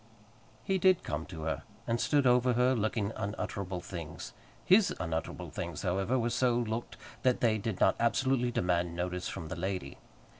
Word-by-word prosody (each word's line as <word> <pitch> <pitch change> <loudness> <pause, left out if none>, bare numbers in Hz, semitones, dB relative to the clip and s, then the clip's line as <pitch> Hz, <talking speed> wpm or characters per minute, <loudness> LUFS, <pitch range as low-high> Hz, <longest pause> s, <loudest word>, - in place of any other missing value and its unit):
He 190 -1 +1
did 185 0 +4
come 80 +2 -3
to 80 -4 -7
her, 80 - -2 0.2
and 115 0 0
stood 145 -2 +3
over 125 0 +4
her, 125 +2 +3
looking 110 -2 0
unutterable 100 -2 -3
things. 85 -3 -7 0.3
His 195 +2 +6
unutterable 80 -1 -3
things, - - -5
however, 95 +8 +1
were 120 -1 0
so 125 0 +2
looked, 115 0 -3 0.2
that 125 -1 +2
they 110 -2 +2
did 105 -2 -3
not - - +4
absolutely 125 +1 +2
demand 90 -5 0
notice 90 +1 -2
from 80 - -6
the 95 - -4
lady. 90 -5 -4
110 Hz, 165 wpm, -31 LUFS, 90-125 Hz, 0.3 s, His